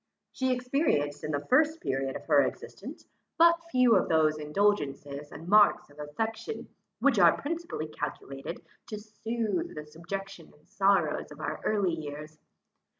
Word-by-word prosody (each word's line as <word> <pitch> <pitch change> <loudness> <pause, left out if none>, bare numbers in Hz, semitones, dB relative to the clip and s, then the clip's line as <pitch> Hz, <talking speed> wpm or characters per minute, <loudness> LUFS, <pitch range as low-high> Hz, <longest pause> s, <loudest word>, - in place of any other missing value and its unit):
She 260 0 0
experienced 250 - 0
in - - -3
the 145 -2 -2
first 310 +5 +3
period 135 - -2
of - - -7
her 145 -3 +5
existence, - - -6 0.3
but 335 0 +6
few 255 -5 +5
of - - +2
those 155 -1 +3
indulgences 150 -4 -1
and 165 - -10
marks 205 -6 +4
of 145 - -18
affection, 220 - -4 0.3
which - - +3
are - - +6
principally 335 - -4
calculated 140 0 -6 0.2
to 215 - -5
sooth 220 -2 -3
the 150 0 -6
subjection 175 +3 -7
and 150 - -29
sorrows 195 -6 +1
of 150 - -11
our 155 0 -4
early 200 -5 +1
years. 150 0 -7
170 Hz, 150 wpm, -29 LUFS, 150-225 Hz, 0.3 s, but